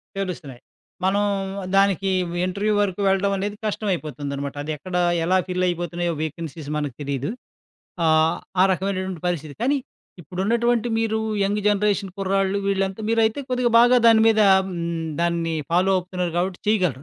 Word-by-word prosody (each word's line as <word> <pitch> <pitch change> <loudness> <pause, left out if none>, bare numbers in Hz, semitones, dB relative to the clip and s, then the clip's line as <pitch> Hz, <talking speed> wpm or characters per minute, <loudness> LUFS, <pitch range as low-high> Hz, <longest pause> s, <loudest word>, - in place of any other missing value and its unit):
తెలుస్తున్నాయి. 175 -10 -5 0.4
మనం 200 +2 +2 0.5
దానికి 195 -1 +3 0.4
ఇంటర్యూ 200 +3 -1
వరుకు 200 -1 -1
వెళ్ళడం 195 +1 +2
అనేది 205 +2 -3
కష్టమై 205 -3 -1
పోతుందనమాట. 140 -1 -5
అదెక్కడ 155 +4 -5 0.3
ఎలా 185 +2 +3
ఫిల్ 185 0 0
అయిపోతున్నాయో 175 0 -2
వేకన్సీస్ 160 -1 -5
మనకి 145 -5 -3
తెలీదు. 140 0 -3 0.8
ఆ! - - +4 0.5
ఆ - - +8
రకమైనటువంటి 190 -2 -2
పరిస్థితి. 155 -4 -3
కానీ, 280 +4 +2 0.4
ఇప్పుడున్నటువంటి 230 +8 0
మీరు 220 -1 0 0.3
యంగ్ 205 +1 0
జనరేషన్ 205 -2 0
కుర్రాళ్ళు 195 0 +1
వీళ్లంతా 195 0 -1
మీరైతే 225 +3 +2
కొద్దిగా 250 -1 +1
బాగా 245 +1 +6
దీని 225 -1 +6
మీద 220 -1 +3 0.3
హూ, - - -6 0.5
దాన్ని 170 -1 0 0.2
ఫాలో 180 +3 +3
అవుతున్నారు 180 -1 -3
గాబట్టి 180 +1 -2
చేయగలరు. 180 - +1
190 Hz, 135 wpm, -23 LUFS, 170-205 Hz, 0.8 s, ఆ